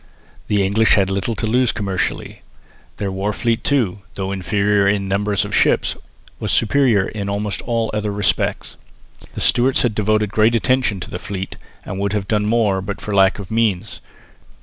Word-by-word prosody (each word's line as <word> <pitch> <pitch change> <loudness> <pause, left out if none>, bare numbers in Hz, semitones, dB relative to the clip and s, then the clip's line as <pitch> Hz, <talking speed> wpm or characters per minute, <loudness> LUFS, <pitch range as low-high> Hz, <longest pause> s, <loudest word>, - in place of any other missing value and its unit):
The 100 -2 +2
English 110 +3 +4
had 95 -2 +1
little 100 +4 -1
to - - -2
lose 120 +2 +2
commercially. 95 -3 -3 0.6
Their 100 -2 -2
war 95 +2 -2
fleet 115 0 -1
too, 115 -9 +1 0.2
though 95 0 -3
inferior 100 +1 +1
in 100 0 +1
the - - -5
number 100 +2 0
of 100 - 0
ships, - - +2 0.4
was - - -2
superior 115 -4 +3
in 100 -2 -5
almost 100 0 -2
all 115 -2 0
other 105 -1 -1
respects. 100 -1 -1 0.6
The - - -4
Stuarts 125 +2 +3
had 120 -3 +1
devoted 105 -1 +1
great 110 +2 +3
attention 115 -4 +1
to - - -7
the 90 - -4
fleet 95 -1 -5 0.3
and 95 - -5
would 100 +1 -1
have 100 -2 -2
done 105 -1 0
more 105 -4 +2
but 100 +1 -5
for 105 - -5
lack 95 -1 +4
of 100 -1 -9
means. 110 -5 0
105 Hz, 180 wpm, -19 LUFS, 100-110 Hz, 0.6 s, English